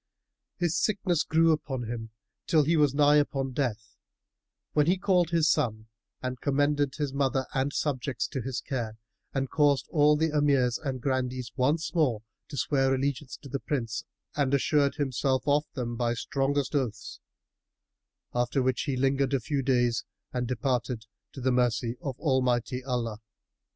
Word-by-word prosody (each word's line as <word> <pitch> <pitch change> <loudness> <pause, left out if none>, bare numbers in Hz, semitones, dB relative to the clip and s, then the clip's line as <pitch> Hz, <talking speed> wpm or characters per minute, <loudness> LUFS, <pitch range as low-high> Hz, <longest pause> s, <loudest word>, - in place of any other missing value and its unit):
His 175 -2 0
sickness 190 -6 +1
grew 165 0 +3
upon 135 -5 -2
him 115 -1 -5 0.4
till 155 -2 +4
he 165 +4 +2
was 145 -3 +3
nigh 145 0 +5
upon 135 -2 0
death, 115 -5 -3 0.8
when 150 0 +3
he 180 +2 +3
called 185 -4 +2
his 165 -2 +3
son 110 -5 0 0.3
and 130 -1 -4
commended 145 0 +1
his 145 -3 -2
mother 135 -1 +1
and 135 +1 0
subjects 140 -3 -1
to 130 - -3
his 130 0 -3
care 115 -6 -4 0.3
and 135 -1 -2
caused 145 -3 +3
all 150 -2 +5
the 160 +1 +1
Emirs 140 -5 +2
and 130 -3 -3
Grandees 130 -3 -1
once 150 +6 +1
more 130 -11 +1 0.3
swear 135 -2 +1
allegiance 140 0 -2
to - - -8
the 140 +1 -3
Prince 115 -8 -2 0.3
and 140 -2 +2
assured 140 +1 +2
himself 135 -2 0
of 145 +1 +3
them 120 -2 -3
by 120 0 0
strongest 140 +3 -1
oaths; 115 -7 -2 1.1
after 120 +2 +1
which 130 -1 +1
he 135 -4 -1
lingered 135 +1 +2
a - - +1
few 140 +3 -1
days 120 -3 +2 0.3
and 125 -1 -1
departed 125 -2 -1 0.3
to 135 - -9
the 130 +1 +2
mercy 120 -1 +1
of 135 -4 -4
Almighty 130 -3 +1
Allah. 120 -4 -2
135 Hz, 155 wpm, -28 LUFS, 125-145 Hz, 1.1 s, nigh